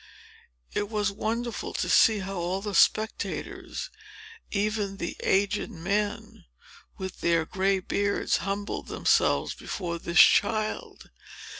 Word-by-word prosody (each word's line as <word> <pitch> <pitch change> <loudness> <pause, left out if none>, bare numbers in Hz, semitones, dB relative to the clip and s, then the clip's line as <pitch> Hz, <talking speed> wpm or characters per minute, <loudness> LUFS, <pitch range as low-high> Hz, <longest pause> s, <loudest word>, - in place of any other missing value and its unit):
It 205 - -1
was 210 -2 0
wonderful 230 +3 -3
to - - -1
see 220 -2 +5
how 195 +1 -5
all 180 +2 -2
the 205 -1 -4
spectators, 220 - 0 0.6
even 205 -1 -1
the 170 - -4
aged 200 +2 +1
men, 200 +5 -3 0.5
with 190 -1 -7
their 170 -1 +2
gray 195 +3 +1
beards, 200 +2 0
humbled 200 +1 -4
themselves - - +2
before 170 -4 -5
this 170 +1 +1
child. 215 +1 +3
200 Hz, 115 wpm, -27 LUFS, 190-210 Hz, 0.6 s, see